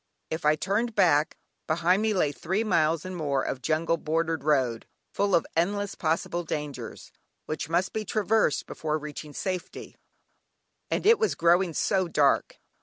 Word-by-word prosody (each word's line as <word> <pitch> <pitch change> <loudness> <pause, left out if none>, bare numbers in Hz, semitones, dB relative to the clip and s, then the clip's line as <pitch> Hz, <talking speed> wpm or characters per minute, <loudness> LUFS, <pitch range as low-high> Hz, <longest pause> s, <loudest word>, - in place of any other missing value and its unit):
If 160 -1 -3
I 150 0 +5
turned 210 +7 -1
back, 145 +2 +3 0.3
behind 175 +4 +2
me 220 0 +1
lay 155 -6 +2
three 190 +9 -2
miles 165 -5 +1
and 185 0 -5
more 140 -5 -1
of 130 - -4
jungle 160 +4 +1
bordered 160 -1 -1
road, 130 -6 +1 0.3
full 200 -1 +2
of 170 - +2
endless 200 +4 0
possible 165 +2 -1
dangers, 150 -4 -6 0.3
which 155 0 -4
must 175 +3 0
be 220 - -2
traversed 215 -5 +1
before 155 -1 -3
reaching 150 0 -8
safety, 185 -3 -5 0.9
and - - -1
it 450 +2 +6
was 440 - +1
growing 170 0 +3
so 190 -2 +1
dark. 145 -4 +2
165 Hz, 155 wpm, -27 LUFS, 155-190 Hz, 0.9 s, it